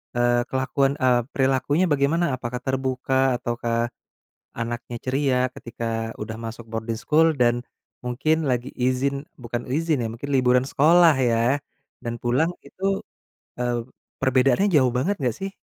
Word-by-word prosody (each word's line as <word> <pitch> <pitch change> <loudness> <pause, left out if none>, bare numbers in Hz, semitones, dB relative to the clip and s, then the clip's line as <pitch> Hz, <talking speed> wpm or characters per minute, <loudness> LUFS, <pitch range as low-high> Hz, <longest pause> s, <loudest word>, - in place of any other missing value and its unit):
eee, 120 0 +3
kelakuan, 135 +1 +1
eee, 125 -2 +4
perilakunya 135 +6 +2
bagaimana? 145 +5 +2
Apakah 125 0 -5
terbuka 130 0 +1
ataukah, 120 0 -1 0.7
anaknya 120 +1 -4
ceria, 130 -1 +1 0.2
ketika 115 -1 -4
udah 110 +1 -5
masuk 115 0 -7
boarding 115 0 -3
school 160 +4 +4
dan, 120 -1 +2 0.4
mungkin 150 +5 0
lagi 125 +1 -1
izin, 130 +3 0
bukan 120 -1 -4
izin 155 -1 +1
ya, - - -1
mungkin 120 +5 -7
liburan 125 -1 +3
sekolah 165 +4 +5
ya, 120 +3 +2 0.4
dan 120 0 -3
pulang 125 +7 +2 0.2
itu, 195 +1 -2 0.6
e - - +1 0.6
perbedaannya 130 +7 +3
jauh 130 -5 +5
banget 175 +11 0
enggak 125 -4 0
sih? 195 0 -5
130 Hz, 135 wpm, -24 LUFS, 120-140 Hz, 0.7 s, sekolah